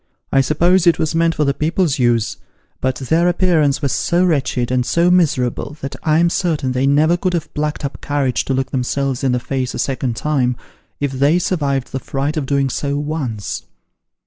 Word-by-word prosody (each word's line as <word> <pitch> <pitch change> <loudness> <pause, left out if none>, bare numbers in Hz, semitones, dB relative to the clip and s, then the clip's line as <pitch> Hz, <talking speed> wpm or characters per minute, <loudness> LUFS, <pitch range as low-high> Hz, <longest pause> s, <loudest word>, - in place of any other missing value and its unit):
I 135 - +4
suppose 175 +6 +2
it 170 - +5
was 160 +1 -1
meant 165 0 +2
for 150 - +1
the 140 - +2
people's 160 0 0
use, 120 -3 +1 0.4
but 130 -1 0
their 160 +7 +1
appearance 160 -6 +2
was 140 - +1
so 175 +2 +1
wretched, 135 -7 0
and 125 -1 +2
so 170 +7 +2
miserable, 150 -5 +1
that 135 - -5
I'm 165 +2 +2
certain 155 -9 0
they 130 +2 +1
never 155 +4 +4
could 180 0 -1
have 165 - -4
plucked 150 0 -2
up 140 - -6
courage 140 -4 0
to 135 - 0
look 130 0 -2
themselves 135 0 -1
in 130 - +2
the 125 - +1
face 130 0 -3
a - - -3
second 130 -3 -2
time, 125 -3 0 0.4
if 145 -1 -1
they 140 +5 +2
survived 145 -7 -1
the 130 - -3
fright 140 +3 -3
of 150 -4 -2
doing 140 -1 +1
so 140 +2 -2
once. 145 -8 -4
140 Hz, 195 wpm, -18 LUFS, 130-160 Hz, 0.4 s, it